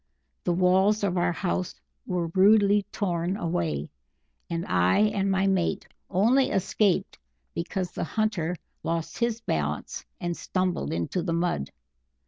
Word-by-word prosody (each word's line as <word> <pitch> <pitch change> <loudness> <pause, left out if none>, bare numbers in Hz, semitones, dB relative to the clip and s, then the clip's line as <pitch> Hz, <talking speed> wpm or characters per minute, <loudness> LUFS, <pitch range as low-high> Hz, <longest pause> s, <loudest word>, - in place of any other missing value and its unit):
The 175 - +1
walls 190 +4 +3
of 190 -3 +1
our 175 0 +2
house 180 +1 -2 0.3
were 180 -2 0
rudely 205 +1 +5
torn 180 -1 -1
away, 85 - -2 0.6
and 170 0 -2
I 90 0 +3
and 205 -2 +2
my 190 0 +2
mate 190 -3 0 0.2
only 240 +9 +3
escaped 190 0 +1 0.3
because 180 +1 -3
the - - -3
hunter 185 -3 -1 0.3
lost 165 0 -3
his 235 -1 0
balance 75 - -2 0.2
and 175 -1 -2
stumbled 185 - -1
into 85 - -1
the 170 -1 -2
mud. 170 - 0
185 Hz, 130 wpm, -27 LUFS, 170-200 Hz, 0.6 s, rudely